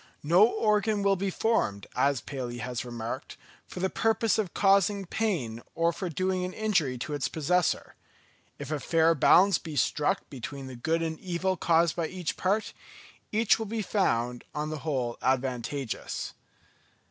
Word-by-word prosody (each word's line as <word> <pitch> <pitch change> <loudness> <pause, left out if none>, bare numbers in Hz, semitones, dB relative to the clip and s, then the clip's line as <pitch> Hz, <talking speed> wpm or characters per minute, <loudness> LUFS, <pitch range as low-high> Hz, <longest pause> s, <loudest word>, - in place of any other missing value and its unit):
No 175 +8 +6
organ 210 -2 +1
will 200 0 +4
be 195 +1 -1
formed, 175 - 0
as 140 -3 +2
Paley 125 -3 -5
has 125 -1 -4
remarked, 120 -2 -6 0.3
for 180 - -7
the 190 - +2
purpose 225 0 +1
of 195 -6 -1
causing 200 0 +3
pain 165 - -2
or 170 +1 +2
for 180 +2 -4
doing 185 +3 -1
an 180 0 -4
injury 180 -12 0
to 150 +5 -5
its 145 -3 -1
possessor. 170 +2 0 0.6
If - - -7
a 155 - -1
fair 165 +2 +3
balance 185 +6 +5
be 160 -3 -7
struck 145 +2 +1
between 135 +1 -7
the 130 -1 -8
good 165 +7 0
and 160 -1 -3
evil 185 +1 -1
caused 170 -1 +2
by 170 -2 -1
each 180 -2 -4
part, 200 +4 0 0.6
each 220 +1 +3
will 220 - -3
be 220 +1 -2
found 125 - 0
on 150 +1 -2
the 155 - -4
whole 130 -6 -2
advantageous. 130 0 -2
165 Hz, 160 wpm, -28 LUFS, 135-195 Hz, 0.6 s, No